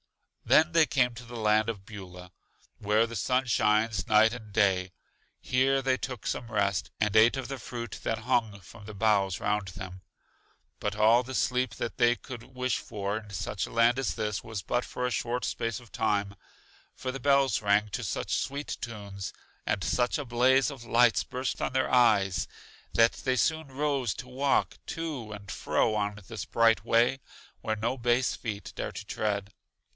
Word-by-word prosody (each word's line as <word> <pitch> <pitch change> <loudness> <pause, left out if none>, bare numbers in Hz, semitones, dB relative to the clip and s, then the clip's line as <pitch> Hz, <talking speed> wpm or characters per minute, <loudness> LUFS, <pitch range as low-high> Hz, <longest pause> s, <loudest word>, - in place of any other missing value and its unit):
Then 160 +2 +5
they 165 -1 +6
came 125 -3 +2
to 120 +1 -10
the 120 0 -9
land 110 0 +2
of 100 -4 -5
Beulah, 90 -4 -10 0.5
where 105 +2 +3
the 115 - -7
sun 125 +6 +1
shines 110 -4 +2
night 110 +1 +5
and 110 -4 -9
day. 95 -3 +2 0.5
Here 135 +2 +2
they 130 0 +2
took 130 -3 -6
some 120 -1 -3
rest, 100 -3 0
and 105 -1 +1
ate 115 +4 +6
of 135 - -4
the 135 -1 -5
fruit 120 -1 -6
that 115 - 0
hung 110 -1 0
from 105 +3 -14
the 110 0 -9
boughs 100 -3 +2
round 105 -2 -1
them. 95 0 -8 0.8
But 105 -1 -2
all 110 +3 +5
the 130 +1 -6
sleep 125 -1 0
that 115 - -4
they 120 -1 +4
could 120 -4 -9
wish 125 -1 0
for 100 +1 -3
in 105 -1 -14
such 100 -2 -3
a - - -11
land 115 +2 +4
as 135 - -1
this 105 -2 -2
was 110 -3 -5
but 120 +5 -1
for 125 - -4
a 125 - -1
short 120 +1 -1
space 115 -2 -2
of 120 -2 -17
time; 105 -2 0 0.6
for 130 - -4
the 135 - -5
bells 140 -2 +3
rang 105 0 +3
to - - -4
such - - -2
sweet 140 +2 -3
tunes, 100 -4 -6 0.4
and 95 - 0
such 120 - +1
a 145 - -4
blaze 130 +3 +3
of 135 -4 -10
lights 120 0 +4
burst 130 +1 -4
on - - 0
their 130 0 +1
eyes, 105 -6 +3 0.5
that 115 0 +5
they 130 -1 -1
soon 160 +2 +1
rose 135 -4 -1
to 125 - -8
walk 135 +2 0
to 150 -10 -4
and 100 -2 -9
fro 110 - +1
on 105 0 -1
this 110 -5 -5
bright 115 -1 +3
way, 120 +3 +3 0.4
where 110 - -1
no 115 +5 -1
base 120 +1 +1
feet 105 -3 -6
dare - - -3
to - - -8
tread. 100 -1 -2
115 Hz, 185 wpm, -29 LUFS, 105-125 Hz, 0.8 s, they